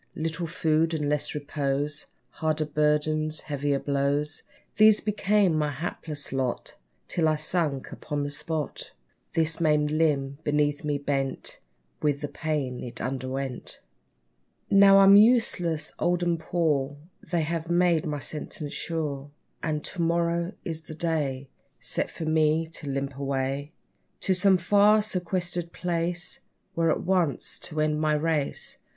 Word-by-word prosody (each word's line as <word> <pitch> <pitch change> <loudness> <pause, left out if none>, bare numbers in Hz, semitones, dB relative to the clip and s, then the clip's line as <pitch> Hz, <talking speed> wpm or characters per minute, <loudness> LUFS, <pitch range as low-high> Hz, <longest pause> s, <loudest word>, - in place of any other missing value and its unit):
Little 165 +2 -2
food, 160 -1 +1
and 150 -2 -1
less 150 0 0
repose; 145 0 -2 0.2
Harder 155 -1 -1
burdens 150 +1 +1
heavier 145 -1 -1
blows, 140 +2 0 0.4
These 215 0 +7
became 205 -3 +2
my 150 -1 +1
hapless 145 0 -4
lot, 130 -2 -2 0.3
Till 165 -2 +1
I 155 - +3
sunk 155 -3 -1
upon 145 -2 -4
the 145 - -3
spot! 150 +1 -4 0.4
This 160 +1 +2
maimed 150 -2 +2
limb 145 -3 +1
beneath 145 0 +1
me 150 -1 0
bent 140 -1 -2 0.4
With 145 -1 0
the 145 - -2
pain 145 -5 -3
it 120 -1 -6
underwent. 130 0 -4 0.9
Now 195 0 +7
I'm 195 0 +8
useless, 205 -8 +4
old, 175 0 +1
and 170 -1 +1
poor, 150 -5 0 0.2
They 175 -2 -1
have 165 +1 -3
made 175 -1 +2
my 150 -1 -2
sentence 150 +1 -4
sure; 145 -4 -3 0.3
And 150 -1 -2
to 180 - -3
morrow 170 +2 0
is 160 -1 -5
the 155 - -7
day, 150 -5 -1 0.3
Set - - 0
for 165 - -6
me 155 0 +2
to 155 -3 -6
limp 135 0 -3
away, 140 +1 -2 0.5
To 190 - +2
some 190 +1 +5
far, 205 +4 +4
sequestered 175 -3 -1
place, 175 0 -2 0.4
There 165 0 +2
at - - 0
once 175 -5 0
to 155 - -4
end 155 0 +1
my 155 -1 +2
race. 150 -2 0
155 Hz, 140 wpm, -26 LUFS, 145-170 Hz, 0.9 s, I'm